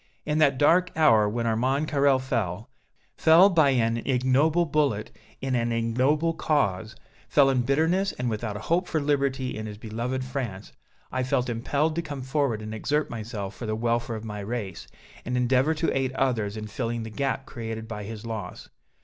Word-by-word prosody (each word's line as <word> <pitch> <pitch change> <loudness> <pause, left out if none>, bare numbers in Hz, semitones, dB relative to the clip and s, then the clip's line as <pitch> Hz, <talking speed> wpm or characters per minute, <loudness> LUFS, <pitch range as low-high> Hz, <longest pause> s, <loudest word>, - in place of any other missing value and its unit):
In 150 +1 0
that 140 -4 +4
dark 175 +6 +4
hour 110 -10 +5
when 115 +2 -2
Armand 130 +6 +1
Carrel 140 -2 +3
fell 115 -4 -3 0.5
fell 170 +5 +6
by 155 -5 +4
an 115 -3 +2
ignoble 135 +7 +2
bullet 145 -8 0 0.3
in 135 -1 -2
an 120 -1 0
ignoble 130 +8 +1
cause 110 - 0 0.3
fell 140 -2 +5
in 130 -2 +2
bitterness 160 +9 +1
and 125 - -3
without 110 -2 -3
a - - -8
hope 175 - 0
for 160 - 0
liberty 140 -3 0
in 110 0 -5
his 105 -1 -8
beloved 120 +4 -3
France 120 -7 -5 0.4
I 130 - -1
felt 130 -1 0
impelled 140 +7 0
to - - +1
come 145 -5 -6
forward 130 -5 -1
and 110 0 -6
exert 150 +7 -1
myself 110 -3 -5
for 120 - -6
the 110 - -1
welfare 115 +1 -1
of 110 0 -7
my 105 -1 -5
race, 100 -3 -5 0.4
and 125 +1 -2
endeavor 130 +5 +2
to 165 +2 0
aid 130 -1 0
others 115 -6 0
in 110 - -5
filling 115 +1 -3
the 110 - -7
gap 135 +3 -2
created 115 -3 -6
by 105 -2 -6
his 110 +1 -8
loss. 110 -5 -6
125 Hz, 185 wpm, -26 LUFS, 110-145 Hz, 0.5 s, fell